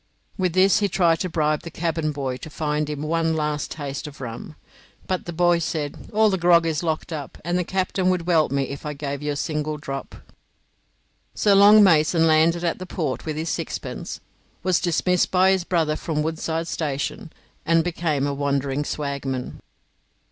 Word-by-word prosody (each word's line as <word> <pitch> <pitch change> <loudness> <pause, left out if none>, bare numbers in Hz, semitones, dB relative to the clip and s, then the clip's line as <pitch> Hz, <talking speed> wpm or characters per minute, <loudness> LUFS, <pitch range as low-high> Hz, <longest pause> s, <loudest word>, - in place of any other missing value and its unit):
With 185 -4 0
this 185 +1 +4
he 205 -1 +1
tried 170 -3 +2
to 185 - -2
bribe 155 -2 0
the 170 - -8
cabin 165 -2 -2
boy 135 -3 -3
to 140 - -9
find 150 0 -2
for 150 - -3
him 145 0 -5
one 165 +1 0
last 150 -1 -2
taste 145 -2 -5
of 145 - -11
rum; 125 +4 -7 0.5
but 185 -1 -2
the - - -3
boy 175 0 +3
said, 155 -3 -4
"All 215 0 +4
the 190 - 0
grog 175 -1 +5
is 160 -2 0
locked 160 0 -2
up, 145 -4 -6
and 175 +1 0
the 180 - +1
captain 185 0 0
would 180 -2 0
welt 165 -3 +3
me 140 0 +1
if 140 +1 -6
I 150 - -4
gave 140 -1 -5
you 150 0 -2
a - - -6
single 150 0 -2
drop." 135 -2 -6 1.2
So 205 - +3
Long 205 +2 +8
Mason 165 -2 +4
landed 165 +2 +3
at 170 +1 -1
the 185 - -7
Port 155 -5 -3
with 155 - -2
his 160 +2 -3
sixpence, - - -4 0.4
was 185 -1 +2
dismissed 180 +1 +1
by 185 +1 +4
his 190 -2 +1
brother 165 -4 +1
from 155 -1 -2
Woodside 160 +1 -2
Station, 155 +5 -3 0.3
and 165 0 +3
became 160 -5 -1
a 145 - -1
wandering 140 0 -1
swagman. 140 -3 -4
160 Hz, 190 wpm, -23 LUFS, 150-175 Hz, 1.2 s, Long